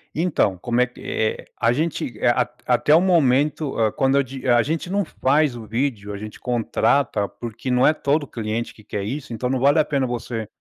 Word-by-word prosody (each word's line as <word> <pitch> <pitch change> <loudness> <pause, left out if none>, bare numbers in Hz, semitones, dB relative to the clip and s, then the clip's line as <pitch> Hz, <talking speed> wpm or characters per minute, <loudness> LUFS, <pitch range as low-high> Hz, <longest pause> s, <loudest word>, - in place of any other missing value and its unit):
Então, 155 - +1
como 120 +5 0
é 125 - +5
que 125 - -16
eh, 110 0 -2
a 115 0 +3
gente, 145 -5 -2
eh, - - +1
a 120 - +3 0.2
a 125 - +2
até 135 +6 +4
o 165 - +5
momento, 150 -4 +2
hã, 110 -2 +2
quando 135 +3 +1
eu 140 - +4
di 130 0 -8
a 120 -1 +5
gente 165 +5 -3
não 200 +1 +1
faz 145 -2 +1
o 115 -2 -8
vídeo 110 -2 -2
a - - -5
gente 105 +1 -9
contrata, 120 -2 +1
porque 120 +3 -7
não 125 +1 +4
é 155 - +5
todo 145 -1 0
cliente 115 0 -4
que 110 - -18
quer 105 -1 -4
isso, 130 +3 -5
então 125 +2 -2
não 130 0 0
vale 140 +4 +4
a 155 - +3
pena 140 -3 0
você 115 -2 -4
125 Hz, 225 wpm, -22 LUFS, 115-145 Hz, 0.2 s, é